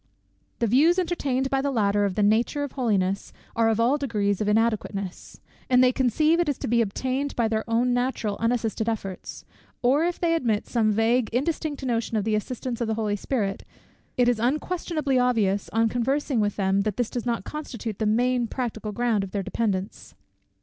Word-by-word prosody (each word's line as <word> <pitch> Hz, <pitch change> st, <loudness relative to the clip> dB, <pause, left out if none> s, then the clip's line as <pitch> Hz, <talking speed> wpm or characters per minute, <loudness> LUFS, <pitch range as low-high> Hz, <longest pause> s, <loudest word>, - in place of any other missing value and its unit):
The 235 Hz, -, 0 dB
views 290 Hz, -, +4 dB
entertained 280 Hz, -7 st, -1 dB
by 270 Hz, 0 st, +2 dB
the 280 Hz, -, 0 dB
latter, 205 Hz, -5 st, +2 dB
of 195 Hz, -2 st, -2 dB
the 210 Hz, -, +1 dB
nature 230 Hz, +7 st, +2 dB
of 285 Hz, -, -4 dB
holiness, 200 Hz, -7 st, 0 dB, 0.2 s
are 225 Hz, -1 st, +3 dB
of 225 Hz, 0 st, +1 dB
all 250 Hz, +6 st, +3 dB
degrees 210 Hz, -7 st, 0 dB
of 210 Hz, -, 0 dB
inadequateness; 210 Hz, -3 st, -1 dB, 0.3 s
and 250 Hz, 0 st, +5 dB
they 250 Hz, -, +5 dB
conceive 305 Hz, +6 st, +2 dB
it 345 Hz, -3 st, +1 dB
is 285 Hz, -, -1 dB
to -, -, -4 dB
be 235 Hz, +1 st, +3 dB
obtained 260 Hz, +6 st, -2 dB
by 235 Hz, -2 st, +2 dB
their 220 Hz, 0 st, -1 dB
own 240 Hz, +2 st, +2 dB
natural 245 Hz, -4 st, -1 dB
unassisted 230 Hz, -1 st, 0 dB
efforts: 195 Hz, -4 st, -5 dB, 0.4 s
or 270 Hz, +6 st, +4 dB
if 350 Hz, 0 st, -1 dB
they 335 Hz, -1 st, +2 dB
admit 235 Hz, -10 st, 0 dB
some 220 Hz, -3 st, +1 dB
vague 225 Hz, +2 st, +2 dB
indistinct 290 Hz, +3 st, -2 dB
notion 230 Hz, -2 st, -1 dB
of 210 Hz, -, 0 dB
the 220 Hz, +1 st, 0 dB
assistance 240 Hz, +3 st, -3 dB
of 235 Hz, -, 0 dB
the 220 Hz, -, 0 dB
Holy 215 Hz, -2 st, -1 dB
Spirit, 205 Hz, -2 st, -2 dB, 0.5 s
it 245 Hz, -1 st, +4 dB
is 245 Hz, -2 st, +2 dB
unquestionably 300 Hz, +1 st, 0 dB
obvious, 215 Hz, -6 st, +1 dB
on 225 Hz, +1 st, +2 dB
conversing 260 Hz, +3 st, 0 dB
with 205 Hz, -1 st, 0 dB
them, 195 Hz, 0 st, +1 dB
that 210 Hz, -1 st, -2 dB
this 245 Hz, -2 st, -1 dB
does 245 Hz, -1 st, -4 dB
not 235 Hz, -1 st, -1 dB
constitute 235 Hz, -8 st, -6 dB
the 215 Hz, -, +1 dB
main 245 Hz, +2 st, +2 dB
practical 220 Hz, -4 st, -4 dB
ground 230 Hz, -2 st, 0 dB
of 195 Hz, -, -5 dB
their 200 Hz, 0 st, -3 dB
dependence. 195 Hz, -2 st, -3 dB
235 Hz, 190 wpm, -25 LUFS, 215-260 Hz, 0.5 s, and